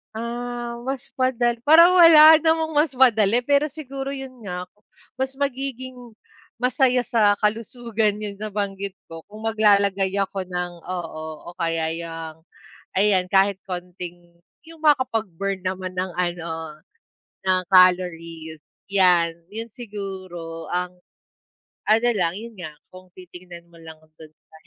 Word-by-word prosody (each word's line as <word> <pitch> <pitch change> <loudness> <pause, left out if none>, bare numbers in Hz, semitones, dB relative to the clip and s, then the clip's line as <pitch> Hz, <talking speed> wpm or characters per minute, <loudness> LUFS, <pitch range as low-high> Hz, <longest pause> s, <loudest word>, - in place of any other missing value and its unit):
Ah, 240 +1 -5
mas 265 0 -4
madal 245 -2 +1
parang 335 +5 +7
wala 320 -3 +9
namang 320 -1 +1
mas 300 +2 +3
madali, 225 -3 +4
pero 285 +1 +2
siguro 275 -2 -6
yun 265 -3 -8
nga, 180 -2 -5 0.5
mas 265 +1 -2
magiging 260 -2 -3 0.6
masaya 250 0 +2
sa 215 -3 +3
kalusugan 220 -1 -1
yun 210 -1 -5
nabanggit 200 -1 -4 0.2
ko 165 0 -10
kung 215 - -10
maglalagay 200 -3 +2
ako 195 -1 -2
ng 180 -1 -4
oo, 170 -3 -6 0.2
o 175 - -10
kaya 165 -1 -1
yang 165 -1 -7 0.5
ayan 190 -2 +2
kahit 195 +1 +2
konting 175 -1 -8 0.3
yung 325 +1 -15
makapag-burn 225 - 0
naman 185 0 -4
ng 185 -1 -4
ano 165 -3 -4 0.6
ng 185 -1 +2
calories, 165 -4 +2 0.2
yan, 180 -4 +3 0.2
yun 225 +1 -7
siguro 185 -7 -8
ang 180 0 -2 1.0
ano 225 +3 +4
lang 180 -5 -1
yun 230 +3 -8
nga 155 -3 -8 0.2
kung 185 0 -14
titignan 180 -1 -12
mo 165 - -16
lang 160 -1 -11 0.2
dun 160 - -11
sa 155 - -42
200 Hz, 125 wpm, -23 LUFS, 180-245 Hz, 1.0 s, wala